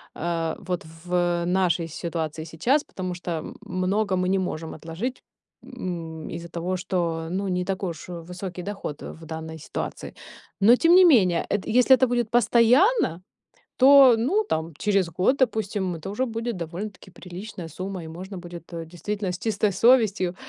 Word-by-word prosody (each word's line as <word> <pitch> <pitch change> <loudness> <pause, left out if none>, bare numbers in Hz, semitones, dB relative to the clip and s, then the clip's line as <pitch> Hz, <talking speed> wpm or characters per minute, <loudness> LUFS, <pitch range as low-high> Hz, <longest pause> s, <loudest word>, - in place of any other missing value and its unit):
а, 165 -1 -2
вот 180 -2 -4 0.2
в 175 -1 +1
нашей 180 -2 +1
ситуации 160 -1 -4
сейчас. 235 - +1
Потому 185 -1 -5
что, 175 0 -6
м - - -8
много 190 +2 0
мы 180 0 0
не 195 0 +2
можем 165 -3 -4
отложить, 165 - -5 0.4
м, 165 -9 -6
из-за 170 0 -7
того, 175 +2 -3
что, 170 -3 -2
ну, 195 +3 -2
не 180 -1 0
такой 190 0 -2
уж 160 - -10
высокий 180 +1 -7
доход 195 -6 -6
в 160 - -9
данной 160 0 -7
ситуации. 155 - -6 0.4
Но 215 +5 +7
тем 330 +6 +5
не 370 0 +8
менее, 190 - +4
эт 205 -2 -1
если 250 +3 +6
это 260 0 +2
будет 240 -2 0
постоянно, 240 - +4 0.6
то 270 -1 +8
ну, 295 - +1
там 160 +1 -2
через 195 -5 +1
год, 185 - +2
допустим, 205 -7 0
это 165 +4 -8
уже 255 +6 -1
будет 230 -1 -3
довольно-таки 185 +4 -7
приличная 180 0 -8
сумма. 185 +2 -6
И - - -8
можно 185 +4 -8
будет, 175 -1 -10
э, 165 -1 -5
действительно 190 +3 -4
с 180 - -5
чистой 215 0 0
совестью 215 -6 +3
185 Hz, 165 wpm, -25 LUFS, 170-220 Hz, 0.6 s, не